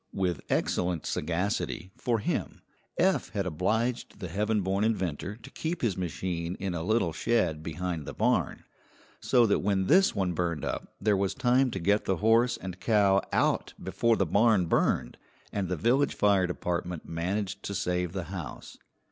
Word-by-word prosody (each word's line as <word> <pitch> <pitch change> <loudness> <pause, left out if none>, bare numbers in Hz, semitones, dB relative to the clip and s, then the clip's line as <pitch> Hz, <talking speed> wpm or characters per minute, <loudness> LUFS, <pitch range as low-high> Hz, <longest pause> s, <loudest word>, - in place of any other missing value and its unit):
With 90 -5 -1
excellent 90 -3 0
sagacity, 90 +2 -2
for 120 -2 0
him, 105 - -3 0.3
Eph 190 +2 +2
had 100 -2 -1
obliged 110 +9 -1
the 90 -4 -5
heaven 105 +4 0
born 95 +2 0
inventor 95 -3 -1
to 110 - -13
keep 165 -1 -4
his 110 -6 +1
machine 90 -1 -3
in 95 -2 -3
a 85 - -3
little 95 -2 +1
shed 85 -4 +1
behind 80 0 -4
the - - -5
barn, - - +1 0.6
so 120 -1 +4
that 105 - +2
when 95 -1 +1
this 190 - +4
one 95 -3 0
burned 85 -3 -2
up - - -5
there 105 -2 +2
was 95 0 0
time 130 0 +3
to 95 - -4
get 100 +4 +2
the 95 - +1
horse 115 +5 +3
and 95 -1 -7
cow 100 -3 +3
out - - +1
before 115 -1 +1
the 95 - +2
barn 100 +2 +3
burned, - - 0 0.3
and 95 -3 -2
the 90 - -1
village 130 - +2
fire 100 -3 +3
department 90 -1 -3
managed 95 +5 -2
to 100 - -5
save 90 -2 -1
the 95 -1 -3
house. 85 -5 -7
95 Hz, 170 wpm, -28 LUFS, 90-110 Hz, 0.6 s, so